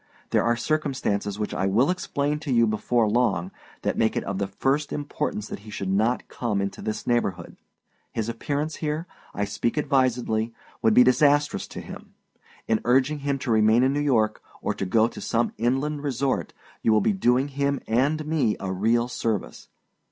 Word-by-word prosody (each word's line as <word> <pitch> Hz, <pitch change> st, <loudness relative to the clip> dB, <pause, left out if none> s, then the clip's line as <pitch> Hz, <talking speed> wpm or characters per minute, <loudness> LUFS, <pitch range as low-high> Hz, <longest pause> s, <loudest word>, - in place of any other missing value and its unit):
There -, -, +3 dB
are 120 Hz, 0 st, +2 dB
circumstances, 125 Hz, -8 st, -1 dB
which 105 Hz, -1 st, -3 dB
I 95 Hz, -, 0 dB
will 120 Hz, -, +3 dB
explain 150 Hz, -5 st, -1 dB
to 150 Hz, -3 st, -4 dB
you 115 Hz, -2 st, +5 dB
before 110 Hz, +1 st, +1 dB
long, 105 Hz, -6 st, +1 dB, 0.3 s
that -, -, -1 dB
make 110 Hz, -1 st, +2 dB
it -, -, -1 dB
of 100 Hz, -1 st, -3 dB
the 100 Hz, -, 0 dB
first 135 Hz, +9 st, 0 dB
importance 145 Hz, -7 st, -3 dB
that -, -, -6 dB
he 105 Hz, +2 st, -13 dB
should 100 Hz, -2 st, -3 dB
not 110 Hz, +5 st, +1 dB
come 110 Hz, -5 st, -2 dB
into 100 Hz, 0 st, -3 dB
this 110 Hz, -, -4 dB
neighborhood. 100 Hz, -8 st, -1 dB, 0.6 s
His 110 Hz, -1 st, -2 dB
appearance 145 Hz, +6 st, -2 dB
here, 155 Hz, +1 st, -2 dB, 0.3 s
I 100 Hz, -, 0 dB
speak 110 Hz, +6 st, -2 dB
advisedly, 125 Hz, -6 st, +1 dB, 0.3 s
would 110 Hz, -1 st, +3 dB
be 125 Hz, -, +9 dB
disastrous 145 Hz, +3 st, +3 dB
to -, -, -8 dB
him. -, -, -11 dB, 0.5 s
In 110 Hz, -1 st, +1 dB
urging 135 Hz, +5 st, +2 dB
him 140 Hz, 0 st, -1 dB
to 120 Hz, -, 0 dB
remain 110 Hz, +2 st, +4 dB
in 135 Hz, +1 st, +3 dB
New 145 Hz, -, 0 dB
York, 115 Hz, -7 st, +1 dB, 0.2 s
or -, -, -1 dB
to 95 Hz, -, -4 dB
go 110 Hz, +4 st, +4 dB
to -, -, -9 dB
some 115 Hz, +1 st, 0 dB
inland 135 Hz, +5 st, 0 dB
resort, 135 Hz, -1 st, -1 dB, 0.3 s
you 115 Hz, -, +3 dB
will 110 Hz, -, +4 dB
be 215 Hz, -, +2 dB
doing 135 Hz, -6 st, +2 dB
him 140 Hz, 0 st, 0 dB
and 145 Hz, +7 st, +1 dB
me 150 Hz, -8 st, +1 dB
a 95 Hz, -, -3 dB
real 115 Hz, +5 st, +2 dB
service. 110 Hz, -, -3 dB
120 Hz, 185 wpm, -25 LUFS, 110-140 Hz, 0.6 s, be